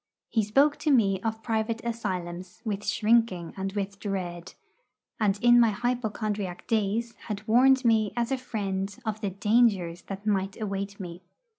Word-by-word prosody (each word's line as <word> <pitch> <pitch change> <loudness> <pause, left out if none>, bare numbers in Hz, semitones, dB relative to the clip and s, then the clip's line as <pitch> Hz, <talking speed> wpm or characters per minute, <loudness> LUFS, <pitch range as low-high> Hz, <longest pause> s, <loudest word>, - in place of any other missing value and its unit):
He 225 - +2
spoke 275 +8 +3
to 310 - -1
me 200 -8 +3
of 220 0 -3
private 225 +1 -1
asylums 185 -4 -4
with 205 -1 -3
shrinking 215 -5 +2
and 195 0 -3
with 200 -1 -3
dread; 180 -4 -4 0.6
and 210 -2 +2
in 240 0 +7
my 230 -1 +6
hypochondriac 215 -5 -2
days 225 +2 0
had 210 0 -5
warned 260 +3 +5
me 220 -3 +3
as 240 +2 0
a 265 - +1
friend 200 -5 -3
of 220 -1 -3
the 205 - -1
dangers 195 -4 +2
that 195 +1 -7
might 195 -2 0
await 200 -1 -4
me. 175 -2 -7
210 Hz, 155 wpm, -27 LUFS, 195-230 Hz, 0.6 s, in